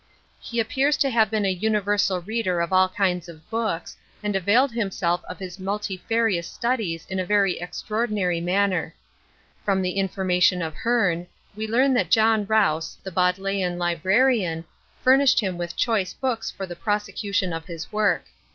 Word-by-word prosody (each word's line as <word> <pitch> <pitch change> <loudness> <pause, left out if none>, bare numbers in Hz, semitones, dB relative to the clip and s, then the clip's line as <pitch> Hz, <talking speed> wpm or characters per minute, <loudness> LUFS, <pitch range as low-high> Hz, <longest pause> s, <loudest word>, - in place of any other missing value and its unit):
He 235 - -4
appears 270 +6 +1
to 275 - +2
have 220 -3 +3
been 215 -2 0
a 195 - +2
universal 205 -1 +1
reader 195 -2 -1
of 170 +2 -1
all 185 0 +5
kinds 180 -3 -1
of 160 -1 -13
books, 220 -7 -2 0.3
and 205 -1 -1
availed 225 +8 +3
himself 190 -6 -1
of 180 - -6
his 185 -1 -8
multifarious 200 0 -1
studies 220 -9 -2
in 190 0 -4
a - - 0
very 200 -1 +2
extraordinary 200 -1 -2
manner. 180 -2 0 0.7
From 195 -2 +1
the 180 - 0
information 185 -2 +1
of 160 -1 -4
Hearne, 180 -6 0 0.3
we 215 +1 -4
learn 260 +5 +3
that 250 - +1
John 220 -2 +3
Rouse, 195 -7 +1
the 190 - -6
Bodleian 180 0 0
librarian, 180 +1 +1 0.4
furnished 265 +1 +5
him 190 -5 -1
with 175 0 -5
choice 215 -6 0
books 250 -4 -2
for 195 - -6
the 175 -2 -8
prosecution 205 -2 -1
of 165 0 -5
his 165 -3 -7
work. 215 0 +1
195 Hz, 160 wpm, -24 LUFS, 180-220 Hz, 0.7 s, all